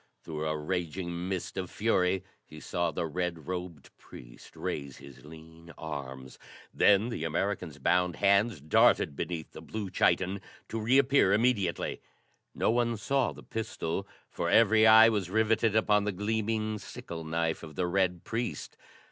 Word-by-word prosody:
Through 80 -1 -4
a 75 0 -1
raging 85 +2 -3
mist 90 -1 -4
of 90 -1 -3
fury 95 -4 +1 0.2
he 75 - -13
saw 85 +2 -1
the 80 +1 -3
red 85 -1 -3
robed 90 -5 -6
priest - - -14
raise 70 -2 -5
his 70 -1 -14
lean 80 +2 -13
arms; 65 -4 -7 0.3
then 105 +3 +4
the 115 - -4
American's 85 0 -2
bound 90 -1 +1
hands 100 -2 +2
darted 75 -1 +3
beneath 80 +1 -4
the - - -10
blue 105 -4 -6
chiton 95 +1 +1 0.3
to 115 - -3
reappear 130 -3 +4
immediately. 105 -5 0 0.5
No - - +1
one 120 -1 +1
saw 135 +4 0
the - - -12
pistol, 100 -4 -4 0.2
for - - -3
every 110 0 +5
eye 110 +1 +9
was 100 -5 -1
rivetted 110 +1 +2
upon 105 -2 +3
the 105 - 0
gleaming, 110 +2 -2
sickle 85 -3 -8
knife 80 0 -1
of 80 -2 -10
the 90 - 0
red 90 -1 0
priest. 115 -10 -4
90 Hz, 150 wpm, -29 LUFS, 80-110 Hz, 0.5 s, eye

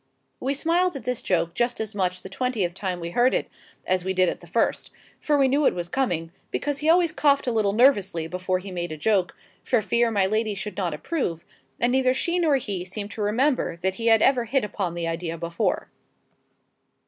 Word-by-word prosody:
We 275 +2 -1
smiled 340 +4 +1
at 275 - -6
this 250 -2 -2
joke 170 -2 0
just 240 0 -1
as 220 0 -4
much 185 -2 -1
the - - -6
twentieth 205 -4 -1
time 185 -1 -3
we 170 0 -5
heard 245 +6 +3
it - - -1 0.4
as 185 -1 +1
we 190 +1 -2
did 185 -1 +4
at - - -5
the 175 - -13
first; 225 +8 0 0.3
for 295 -1 +1
we 275 -1 +4
knew 280 +2 +3
it - - +1
was 175 -1 -3
coming, 175 -10 -1 0.2
because 290 -1 -2
he 305 - 0
always 340 -1 +4
coughed 285 -3 +2
a 250 - 0
little 215 -3 +2
nervously 200 - +3
before 185 +2 -1
he 190 +1 -8
made 175 -2 -4
a 155 - -5
joke, 195 +1 +1 0.3
for 245 - +2
fear 235 +3 +1
my 200 -4 +2
lady 215 +1 0
should 205 0 -6
not 175 -6 -2
approve: 170 - -3 0.3
and 240 - +2
neither 260 0 +3
she 345 +5 0
nor 315 -5 +3
he 205 -9 -2
seemed 200 +3 -6
to 215 - -6
remember 240 - +1
that 190 +2 -1
he 230 - 0
had 225 -1 +5
ever 255 -3 +3
hit 265 +3 +1
upon 195 -4 -3
the 170 -1 -2
idea 165 0 -3
before. 170 +1 -2
210 Hz, 220 wpm, -25 LUFS, 180-260 Hz, 0.4 s, had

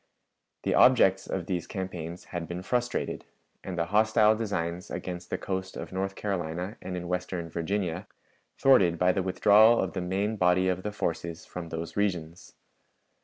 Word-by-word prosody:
The - - +1
objects 95 -7 +5
of 90 -3 -3
those 90 -2 -3
campaigns 90 -3 -5
had 85 -2 -3
been 90 +1 -5
frustrated, 120 +3 -1 0.4
and 95 -2 -5
the 85 - +1
hostile 110 0 +5
designs 90 -4 -3
against 90 -1 -6
the - - -1
coast 95 -1 -4
of - - -7
North 95 +1 -2
Carolina 90 -1 -3
and 90 -1 -5
in 90 0 -5
western 90 -2 -3
Virginia, 90 +2 -2 0.5
thwarted 95 -11 +5
by 90 +2 +4
the 95 - 0
withdrawal 105 +5 +5
of 95 - -1
the 95 - -2
main 100 +5 -1
body 90 0 +3
of 90 0 -1
the 105 - -4
forces 85 -4 -3
from 85 -2 -7
those 80 0 -5
regions. 90 -4 -2
90 Hz, 165 wpm, -28 LUFS, 85-100 Hz, 0.5 s, objects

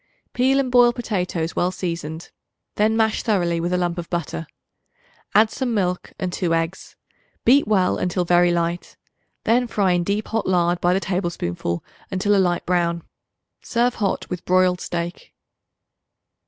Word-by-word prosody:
Peel 265 +2 +3
and 260 -2 -1
boil 245 -1 +6
potatoes 180 -8 -3
well 175 - +1
seasoned; 170 -3 -5 0.4
then 220 +2 +2
mash 220 -1 +2
thoroughly 175 -6 +1
with 175 +2 -2
a 180 - +2
lump 175 -1 -1
of 170 - -7
butter. 165 -2 -3 0.9
Add 215 +1 +5
some 250 -3 -2
milk 180 -3 -1
and 180 -1 -3
2 170 -3 0
eggs; 165 +3 -3 0.5
beat 270 +2 +5
well 190 -4 +2
until 180 0 -1
very 175 0 +4
light. 170 0 -2 0.5
Then 245 +2 +2
fry 200 -5 +1
in 175 -1 +2
deep 205 +4 -2
hot 225 -1 -1
lard 175 -1 +2
by 175 +1 +3
the - - +2
tablespoonful 170 - -3 0.3
until 200 +2 +1
a 195 - +4
light 175 -1 0
brown. 170 -2 0 0.6
Serve 240 +1 +1
hot 205 -5 -2
with 180 -1 -5
broiled 185 -1 +2
steak. 170 0 -5
180 Hz, 155 wpm, -22 LUFS, 175-210 Hz, 0.9 s, boil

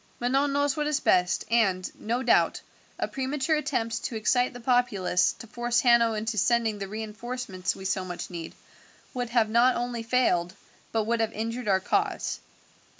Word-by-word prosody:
"Manon 270 +4 +1
knows 285 -1 +1
what 300 -1 -1
is 300 -1 +1
best, 180 -6 +2
and, 195 -6 +2
no 240 +4 -3
doubt, 235 - +3 0.4
a - - -1
premature 270 +3 -1
attempt 230 -6 -2
to 235 - -3
excite 245 +3 +2
the 245 - -10
populace 230 -7 +2
to - - -11
force 240 +1 0
Hanno 235 -2 +4
into 215 0 -2
sending 225 0 +1
the 195 - -4
reinforcements 215 -2 -4
we 190 - -10
so 190 0 0
much 180 0 -6
need 165 -2 -7 0.6
would 245 -2 -3
have 235 -2 +3
not 235 +3 +4
only 240 -1 -3
failed, 225 -7 +1 0.4
but 225 -1 +1
would 230 +2 0
have 225 -1 0
injured 230 +2 -4
our 190 -2 +3
cause. 400 - -1
235 Hz, 170 wpm, -27 LUFS, 210-250 Hz, 0.6 s, Hanno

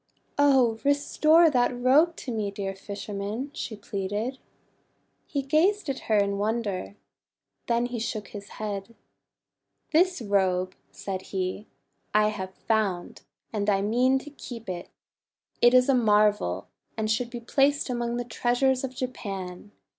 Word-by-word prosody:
"Oh! 260 -6 +4
restore 305 +3 +4
that 245 -1 +1
robe 295 +7 +4
to 260 - -6
me, 215 -3 -1
dear 195 -1 -4
fisherman," 205 +6 -5
she 220 - -5
pleaded. 205 +6 -3 0.9
He 280 -2 -2
gazed 320 +6 +2
at 265 - -2
her 215 - +4
in 200 0 +1
wonder. 210 -3 -2 0.7
Then 235 0 +2
he 245 -1 -4
shook 220 -2 -4
his 200 -1 -9
head. 210 +1 -5 1.0
"This 360 +2 +3
robe," 190 -4 +1 0.2
said 190 -1 -5
he, 190 +2 -3 0.5
"I 210 0 +5
have 190 -3 -6
found, 205 -6 -1 0.3
and 210 -1 0
I 195 -1 +2
mean 250 +5 +3
to 295 - -9
keep 240 -5 -9
it. 175 -1 -5 0.7
It 240 +1 +6
is 250 0 +6
a 275 - +4
marvel, 210 - +2 0.3
and 215 0 0
should 235 +2 0
be 240 0 -6
placed 275 +4 +2
among 240 -2 -2
the 245 - -1
treasures 245 +3 +1
of 260 -1 -4
Japan. 195 -7 -5
225 Hz, 140 wpm, -27 LUFS, 200-255 Hz, 1.0 s, It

